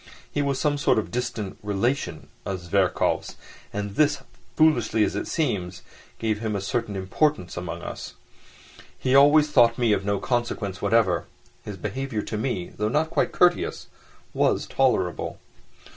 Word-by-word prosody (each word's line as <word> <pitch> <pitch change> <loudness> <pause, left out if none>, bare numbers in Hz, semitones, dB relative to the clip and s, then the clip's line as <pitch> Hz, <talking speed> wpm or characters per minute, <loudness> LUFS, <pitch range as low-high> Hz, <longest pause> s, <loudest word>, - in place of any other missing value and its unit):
He 145 - 0
was 140 -2 0
some 145 -2 +1
sort 140 - +3
of 110 - -1
distant 120 -5 -3
relation 105 - -2
of 95 -1 -3
Zverkov's, 90 +2 0 0.4
and 105 0 -3
this, 145 +5 +2 0.3
foolish 150 -9 +3
as 110 -2 +2
it - - -3
seems, 95 - -2 0.3
gave 110 -2 -1
him 110 -2 -2
a - - 0
certain 105 +1 -2
importance 95 - 0
among 85 -1 -5
us. - - -7 0.8
He 130 - 0
always 145 +2 +6
thought 115 -3 +5
me 120 -3 +3
of 100 - 0
no 100 0 0
consequence 110 -5 -2
whatever; 100 -8 +2 0.4
his 105 -2 -7
behaviour 110 +4 -3
to - - -5
me, 110 -7 -2
though 105 0 -1
not 155 +5 0
quite - - +1
courteous, 260 - +2 0.4
was - - +1
tolerable. - - 0
110 Hz, 150 wpm, -25 LUFS, 100-140 Hz, 0.8 s, always